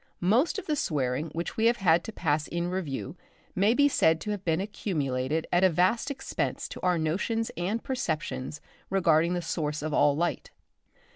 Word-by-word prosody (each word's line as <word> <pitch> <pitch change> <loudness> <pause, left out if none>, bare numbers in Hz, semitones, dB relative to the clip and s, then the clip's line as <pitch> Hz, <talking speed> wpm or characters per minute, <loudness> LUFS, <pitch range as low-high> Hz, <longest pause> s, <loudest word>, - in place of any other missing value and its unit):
Most 230 - +2
of 400 - -5
the 305 - 0
swearing 145 - -1
which 170 +2 -5
we 225 - +2
have 235 +1 +3
had 170 -3 +3
to 225 - -5
pass 150 -6 0
in 170 +1 -2
review 155 -5 -4 0.4
may 205 +5 +3
be 285 +1 +5
said 160 - +3
to 210 - -3
have 205 -2 -4
been 165 -2 +1
accumulated 155 -8 -2
at 175 +1 +4
a 190 - +7
vast 185 - +2
expense 275 -1 -3
to - - -8
our 180 -1 +2
notions 200 +8 -1
and 195 +7 -2
perceptions 160 - -3 0.3
regarding 170 -2 +3
the 175 - -2
Source 155 -2 -2
of 155 -1 -2
all 145 0 +4
light. 170 +3 -1
175 Hz, 185 wpm, -28 LUFS, 155-205 Hz, 0.4 s, a